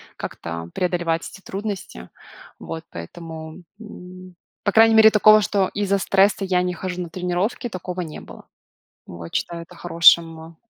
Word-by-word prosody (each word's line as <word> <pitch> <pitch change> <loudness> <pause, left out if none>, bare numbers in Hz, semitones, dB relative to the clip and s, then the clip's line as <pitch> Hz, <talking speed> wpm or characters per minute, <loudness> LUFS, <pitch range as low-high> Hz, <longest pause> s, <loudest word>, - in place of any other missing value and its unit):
как-то 85 0 -7
преодолевать 175 -2 -1
эти 195 - -14
трудности. 200 0 -6 0.5
Вот, 160 0 -8
поэтому, 160 - -9 0.2
м, 185 -3 -12 0.3
по 205 - +1
крайней 225 +1 +5
мере, 220 0 +8
такого, 215 0 +6
что 200 -2 0
из-за 200 -1 0
стресса 195 0 +2
я 185 -1 +1
не 180 0 -2
хожу 180 0 -5
на 175 - -6
тренировки, 180 +7 -2
такого 185 -3 -6
не 160 -3 -7
было. - - -13 0.6
Вот. 85 -1 -10
Считаю 170 -1 -3
это 165 - -15
хорошим 165 -1 +3
180 Hz, 145 wpm, -22 LUFS, 165-200 Hz, 0.6 s, мере